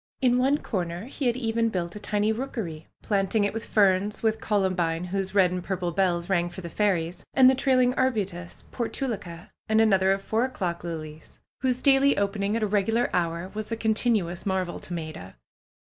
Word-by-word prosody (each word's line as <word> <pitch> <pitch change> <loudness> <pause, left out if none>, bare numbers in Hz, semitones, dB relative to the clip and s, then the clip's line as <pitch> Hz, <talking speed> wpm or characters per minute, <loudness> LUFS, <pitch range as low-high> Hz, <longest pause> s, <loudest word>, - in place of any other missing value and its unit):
In 250 -2 +3
one 270 +3 +3
corner 180 - -4
he 270 +1 -3
had 240 0 +1
even 230 -2 0
built 175 -3 -3
a - - -6
tiny 210 +1 0
rookery, 220 - -5 0.2
planting 200 +1 +1
it 205 - 0
with 225 - -4
ferns; 200 0 +2
with 220 0 +1
columbine, 180 -5 0
whose 190 +2 -3
red 185 -3 +5
and 180 -1 -3
purple 180 -2 -2
bells 175 -2 0
rang 175 -2 +1
for 175 +2 -9
the 170 -2 -7
fairies, 180 -4 0
and 260 -1 +7
the 260 - +7
trailing 255 -2 +3
arbutus, 200 -10 -2
portulacca, 210 -8 -4 0.2
and 220 0 +4
another 195 -4 +4
of 195 0 -1
four 220 +4 0
o'clock 185 -11 -3
lilies, 155 -2 -7 0.2
whose 255 -1 0
daily 275 0 +5
opening 200 +1 0
at 230 - 0
a - - +2
regular 215 +4 +1
hour 170 +1 -1
was 215 +1 -5
a 230 - -1
continuous 220 -6 0
mar 190 -1 0
vel 175 - -7
to - - -9
Maida. 155 - -6
200 Hz, 190 wpm, -26 LUFS, 175-225 Hz, 0.2 s, and